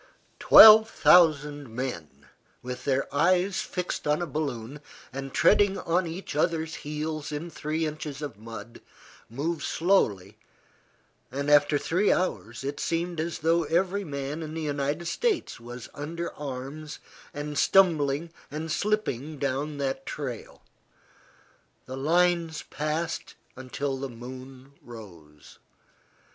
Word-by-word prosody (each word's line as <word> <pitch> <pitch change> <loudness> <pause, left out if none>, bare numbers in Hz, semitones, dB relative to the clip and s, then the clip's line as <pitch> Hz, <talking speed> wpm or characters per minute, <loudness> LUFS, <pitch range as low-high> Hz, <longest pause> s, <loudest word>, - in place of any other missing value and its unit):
Twelve 220 0 +10
thousand 150 - +4
men, 85 - -6 0.4
with 125 0 -6
their 135 -1 +1
eyes 185 +5 +2
fixed 180 -4 -4
on 150 +1 +2
a 175 - -1
balloon, 140 -3 -4 0.3
and 135 0 -6
treading 205 +4 +4
on 175 +1 0
each 165 -1 -6
other's 160 0 0
heels 150 0 -4
in 155 +3 -5
three 155 +1 -2
inches 150 -1 -5
of 145 - -5
mud, 115 0 -10 0.5
move 150 +7 -3
slowly, 105 - +1 0.9
and 140 +2 -2
after 145 0 +5
three 180 +8 +1
hours, 125 - -2
it 140 +1 -4
seemed 170 0 -2
as 165 +1 -2
though 165 0 +3
every 185 +5 0
man 140 -1 -5
in 155 0 -6
the 165 - -3
United 145 +2 -2
States 415 - -1
was 120 +1 -9
under 165 +4 -5
arms 145 +2 -7 0.3
and 145 0 -5
stumbling 165 -4 +3 0.2
and 155 +2 -5
slipping 155 - -1
down 140 +2 -2
that 135 -1 -3
trail. 130 -7 -6 1.2
The 130 - -7
lines 165 +2 +1
passed 155 +3 -3 0.2
until 135 +1 -4
the 135 0 -4
moon 130 +3 -11
rose. 85 -11 -13
150 Hz, 125 wpm, -27 LUFS, 135-165 Hz, 1.2 s, Twelve